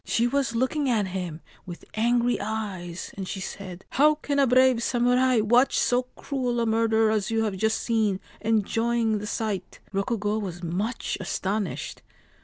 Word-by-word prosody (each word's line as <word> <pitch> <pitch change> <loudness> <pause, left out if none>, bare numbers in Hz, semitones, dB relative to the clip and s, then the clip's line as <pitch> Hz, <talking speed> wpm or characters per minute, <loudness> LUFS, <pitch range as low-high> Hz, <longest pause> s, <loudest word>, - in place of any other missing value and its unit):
She 235 - +1
was 265 -1 0
looking 265 +4 +1
at 210 -5 +1
him 175 -4 -5 0.3
with 175 -1 -9
angry 240 +1 +2
eyes, 200 -5 -4
and 190 -2 -5
she 195 - -4
said: 185 -1 -7
' - - -46
How 305 +1 +6
can 285 -1 -2
a 275 - +5
brave 255 -1 +4
samurai 245 0 +3
watch 240 +5 +3
so 250 +1 +2
cruel 250 -4 -2
a 230 - +1
murder 225 -1 +3
as 210 -3 0
you 225 0 +1
have 210 -3 -1
just 220 +3 +1
seen, 215 -5 +1 0.2
enjoying 225 +1 +1
the 210 - -6
sight? 210 -5 -3
' - - -31
Rokugo 210 +1 0
was 180 -4 -6
much 200 +10 -2
astonished. 195 +1 -3
220 Hz, 170 wpm, -26 LUFS, 200-245 Hz, 0.3 s, How